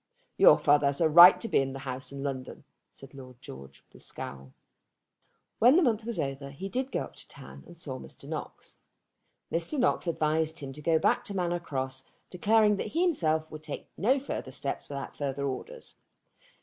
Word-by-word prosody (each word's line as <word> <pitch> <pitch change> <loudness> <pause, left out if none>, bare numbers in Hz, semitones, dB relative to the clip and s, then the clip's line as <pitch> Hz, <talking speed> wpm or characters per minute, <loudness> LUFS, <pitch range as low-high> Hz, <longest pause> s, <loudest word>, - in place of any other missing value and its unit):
"Your - - +7
father 145 -1 +3
has 140 0 -1
a 165 - +4
right 175 +4 +9
to 230 - -3
be - - +2
in 135 0 -2
the - - -6
house 130 -1 -5
in 140 0 -7
London," 135 -2 -5 0.3
said 135 0 -14
Lord 130 -3 -12
George 70 - -12
with - - -18
a - - -9
scowl. 65 -1 -8 1.1
When 245 +5 +6
the 360 - +5
month 225 -5 +1
was 235 -1 -3
over 140 0 -3
he 165 +8 -7
did 260 +4 -2
go - - -1
up - - -12
to - - -9
town, - - -11
and 175 - -14
saw 140 -6 -6
Mr. - - -13
Knox. - - -7 0.7
Mr. 170 - -1
Knox 250 -7 +1
advised 160 0 0
him 135 -3 -6
to 150 - -11
go 160 +1 +2
back - - +1
to 200 - -5
Manor 175 -2 -1
Cross, 130 -4 -4 0.3
declaring 210 +3 +3
that - - -3
he 330 +11 0
himself 160 - 0
would 155 - -8
take 155 -2 -7
no 260 +7 +2
further 265 - -5
steps 135 +1 -4
without 140 -1 -6
further 140 -1 -3
orders. 465 - -6
155 Hz, 200 wpm, -28 LUFS, 135-195 Hz, 1.1 s, right